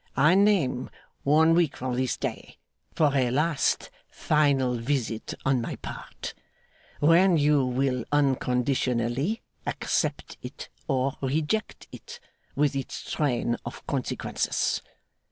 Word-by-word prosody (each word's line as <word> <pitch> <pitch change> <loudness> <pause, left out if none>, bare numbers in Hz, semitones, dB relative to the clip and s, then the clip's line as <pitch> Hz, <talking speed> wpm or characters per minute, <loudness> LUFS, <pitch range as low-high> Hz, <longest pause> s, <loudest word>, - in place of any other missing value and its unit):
I 150 +5 +5
name 185 -11 +2 0.3
one 160 +3 +4
week 165 -4 +2
from 125 -1 -3
this 130 0 0
day, - - -5 0.4
for 145 -3 +3
a 130 -3 +2
last 150 +3 +1 0.2
final 140 -4 +2
visit 120 -2 -2
on 135 -2 +2
my - - -4
part; - - -8 0.7
when 170 +4 +5
you 145 -1 +3
will 125 -1 0
unconditionally 130 - +1 0.2
accept - - -2
it - - -8 0.2
or 135 0 0
reject 155 +10 -1
it, 475 0 -10 0.4
with 145 -1 +2
its 135 - -5
train 120 -5 0
of - - -8
consequences. - - -1
140 Hz, 115 wpm, -27 LUFS, 125-155 Hz, 0.7 s, I